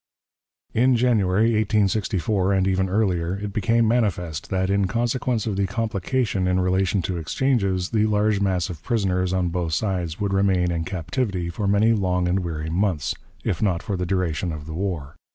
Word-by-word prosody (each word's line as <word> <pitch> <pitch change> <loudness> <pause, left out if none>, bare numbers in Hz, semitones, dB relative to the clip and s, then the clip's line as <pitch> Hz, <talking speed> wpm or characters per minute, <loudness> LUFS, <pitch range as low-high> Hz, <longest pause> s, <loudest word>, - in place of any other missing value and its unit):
In 125 +2 +4
January, 110 -3 +2
1864, 100 -2 +1
and 95 -1 +2
even 95 0 +1
earlier, 90 -4 0
it 100 0 -5
became 115 +3 +2
manifest 95 -8 -1
that, 95 0 0
in 100 -1 +2
consequence 120 +1 -1
of 105 -4 -2
the 100 -1 +1
complication 110 -1 -1
in 90 0 +2
relation 95 +1 +1
to 90 0 -2
exchanges, 95 - 0
the 110 -1 +2
large 105 -1 +2
mass 95 -4 +1
of 80 -3 -9
prisoners 95 -4 0
on 90 -1 0
both 85 -2 -2
sides 90 -4 -1
would 100 -2 -1
remain 95 -3 +2
in 80 -1 -2
captivity 90 +1 -2
for 100 +4 -3
many 105 +3 +4
long 90 -4 0
and 90 +2 +1
weary 80 -3 -4
months, 90 -4 0 0.3
if 85 - -2
not 95 -6 +1
for 100 - -2
the 90 -1 -2
duration 90 -2 -1
of 75 -2 -7
the 80 - -7
war. 85 -6 -4
95 Hz, 175 wpm, -23 LUFS, 90-105 Hz, 0.3 s, In